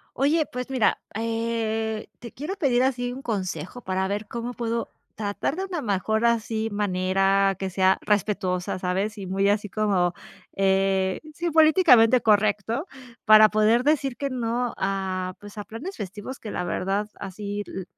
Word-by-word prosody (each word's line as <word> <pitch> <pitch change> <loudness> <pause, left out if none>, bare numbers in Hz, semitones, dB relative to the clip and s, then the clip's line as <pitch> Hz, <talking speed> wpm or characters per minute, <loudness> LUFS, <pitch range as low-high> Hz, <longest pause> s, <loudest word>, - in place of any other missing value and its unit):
Oye, 300 +4 +2
pues 250 +1 -5
mira, 255 -5 +2
eh, 225 -1 -2
te 235 -2 -10
quiero 310 +9 -5
pedir 260 -9 +2
así 245 -2 0
un 260 +2 -8
consejo, 185 - -4
para 190 -3 -1
ver 205 +1 -3
cómo 235 +2 -5
puedo 230 -1 -3 0.2
tratar 205 +5 -2
de 380 - -2
una 350 -5 -4
mejor 220 +2 0
así 225 -1 +1
manera 195 0 +2
que 190 -1 -3
sea 190 +1 +3
respetuosa, 195 -3 -1
¿sabes? 190 +4 -2
Y 195 - -6
muy 195 +2 +1
así 210 0 +1
como, 190 -4 +1 0.4
eh, 190 -1 +2
sí, 345 +3 -2
políticamente 310 -7 +6
correcto 215 - +2 0.4
para 215 0 +8
poder 215 +3 +3
decir 280 -4 +1
que 280 +2 -3
no 240 -1 -2
a, 190 -1 -2
pues, 205 +1 -12
a 205 - -5
planes 310 - -7
festivos 205 +7 -7
que 215 - -7
la 180 - -3
verdad 195 +4 -1
así 205 +1 -5
lo 190 - -6
215 Hz, 155 wpm, -25 LUFS, 195-240 Hz, 0.4 s, para